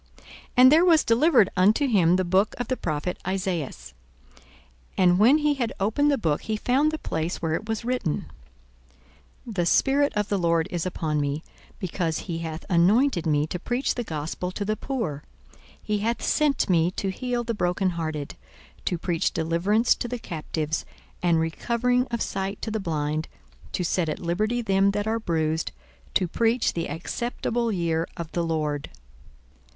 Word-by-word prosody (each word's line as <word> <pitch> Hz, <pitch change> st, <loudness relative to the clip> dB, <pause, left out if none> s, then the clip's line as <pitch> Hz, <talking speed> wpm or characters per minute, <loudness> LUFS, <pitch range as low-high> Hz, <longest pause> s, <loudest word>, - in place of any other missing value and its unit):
42:004:017 -, -, -22 dB, 0.3 s
And 255 Hz, +1 st, +8 dB
there 325 Hz, +4 st, +6 dB
was 330 Hz, -3 st, +5 dB
delivered 235 Hz, -, +4 dB
unto 210 Hz, +10 st, +4 dB
him 180 Hz, -8 st, +4 dB
the 185 Hz, -, +1 dB
book 190 Hz, +4 st, +2 dB
of 245 Hz, -, -4 dB
the 255 Hz, -, +1 dB
prophet 160 Hz, -2 st, -3 dB
Esaias. 180 Hz, -, -3 dB, 1.0 s
And 180 Hz, -1 st, +4 dB
when 245 Hz, +8 st, +6 dB
he 300 Hz, -1 st, +2 dB
had 245 Hz, -5 st, -2 dB
opened 220 Hz, +9 st, +2 dB
the 285 Hz, -, +2 dB
book, 155 Hz, -, 0 dB
he 215 Hz, -1 st, -2 dB
found 270 Hz, +7 st, +2 dB
the 315 Hz, -, -3 dB
place 160 Hz, -, -3 dB
where 160 Hz, -1 st, -1 dB
it 215 Hz, +7 st, -3 dB
was 225 Hz, +1 st, -2 dB
written, 245 Hz, -11 st, -1 dB, 1.2 s
42:004:018 230 Hz, -, -6 dB
The 175 Hz, -2 st, +1 dB
Spirit 285 Hz, +8 st, +3 dB
of 210 Hz, -1 st, 0 dB
the 200 Hz, -, +1 dB
Lord 170 Hz, -2 st, +2 dB
is 175 Hz, 0 st, -2 dB
upon 155 Hz, -4 st, -1 dB
me, 145 Hz, +2 st, -2 dB, 0.3 s
because 170 Hz, -3 st, -2 dB
he 170 Hz, -3 st, -4 dB
hath 160 Hz, -1 st, -5 dB
anointed 190 Hz, -, +3 dB
me 150 Hz, -1 st, +2 dB
to 180 Hz, +3 st, -5 dB
preach 245 Hz, +8 st, -1 dB
the 245 Hz, -, -3 dB
gospel 160 Hz, 0 st, -4 dB
to 200 Hz, +2 st, -4 dB
the 215 Hz, +1 st, 0 dB
poor; 215 Hz, -, -3 dB, 0.6 s
he 210 Hz, -1 st, -2 dB
hath 230 Hz, +3 st, -1 dB
sent 295 Hz, -3 st, +2 dB
me 170 Hz, -2 st, +3 dB
to 195 Hz, +1 st, -3 dB
heal 245 Hz, +3 st, -2 dB
the 230 Hz, 0 st, -2 dB
brokenhearted, 170 Hz, -6 st, -1 dB, 0.5 s
to 175 Hz, -, 0 dB
preach 170 Hz, -1 st, -1 dB
deliverance 170 Hz, +8 st, +2 dB
to -, -, -4 dB
the 245 Hz, +1 st, -3 dB
captives, 160 Hz, -5 st, -3 dB, 0.4 s
and 170 Hz, -2 st, +3 dB
recovering 245 Hz, +10 st, 0 dB
of 235 Hz, -1 st, -1 dB
sight 195 Hz, +1 st, -3 dB
to 220 Hz, -, -2 dB
the 220 Hz, -, -1 dB
blind, 155 Hz, -3 st, -2 dB, 0.4 s
to 180 Hz, -, -1 dB
set 170 Hz, -1 st, 0 dB
at -, -, -2 dB
liberty 215 Hz, +8 st, -1 dB
them 195 Hz, -1 st, +3 dB
that 205 Hz, 0 st, -1 dB
are 225 Hz, +1 st, 0 dB
bruised, 160 Hz, -5 st, -1 dB, 0.4 s
42:004:019 -, -, -27 dB
To 185 Hz, -, +3 dB
preach 230 Hz, +6 st, +1 dB
the 165 Hz, -, -3 dB
acceptable 235 Hz, +7 st, -2 dB
year 170 Hz, -3 st, 0 dB
of 170 Hz, -1 st, -6 dB
the 170 Hz, -, -1 dB
Lord. 155 Hz, -3 st, -2 dB
185 Hz, 175 wpm, -25 LUFS, 165-235 Hz, 1.2 s, And